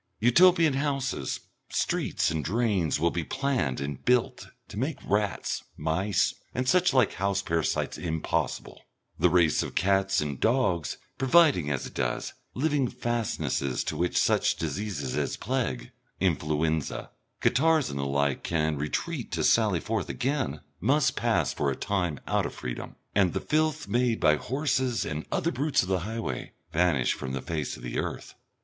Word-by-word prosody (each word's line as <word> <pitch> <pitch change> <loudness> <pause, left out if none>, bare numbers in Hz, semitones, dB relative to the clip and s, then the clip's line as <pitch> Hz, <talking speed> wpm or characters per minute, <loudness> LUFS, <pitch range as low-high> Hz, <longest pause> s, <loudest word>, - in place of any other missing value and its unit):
Utopian 165 +6 +5
houses, 135 -1 -1 0.3
streets - - 0
and 80 -2 -2
drains 100 -6 +1
will 85 +2 +2
be 85 - -2
planned 130 - -1
and 70 -1 -5
built 125 -1 +1 0.2
to 105 - -6
make 140 +3 -1
rats, 105 -1 0
mice, 85 +5 +1 0.2
and 125 0 -1
such 180 +3 +4
like 130 -2 +3
house 100 0 0
parasites 80 -3 -1
impossible; 80 -2 -2 0.4
the 90 +2 +5
race 85 -3 +3
of - - -5
cats 95 0 +2
and 75 -3 -3
dogs 110 - +1 0.2
providing, 135 - +4
as 70 -3 -2
it - - -9
does, - - -2 0.2
living 145 -1 +1
fastnesses 115 - -1
to - - -3
which 90 +1 0
such - - +3
diseases 85 -2 -3
as - - -1
plague, 110 - -2 0.3
influenza, 80 -3 0 0.3
catarrhs 155 +2 +3
and 70 - -4
the - - -1
like, 70 0 0
can 80 -2 0
retreat 120 - -3
to 80 -1 0
sally 105 -4 +4
forth 110 +2 -2
again 130 - -1 0.2
must - - +2
pass - - +1
for 70 - 0
a 70 - -1
time 90 -7 -1
out - - +1
of - - -10
freedom, 60 -1 -6 0.2
and 95 -4 +3
the - - 0
filth 155 -1 0
made 120 +2 +1
by 75 - +5
horses 130 - 0
and 80 0 -4
the - - -33
other 170 - 0
brutes 140 0 +1
of 95 - -6
the 95 -1 +2
highway 110 +5 -4 0.2
vanish 80 -7 +2
from 65 - -5
the 65 - -2
face 75 -4 -3
of - - -13
the - - -3
earth. - - -4
100 Hz, 160 wpm, -28 LUFS, 80-130 Hz, 0.4 s, Utopian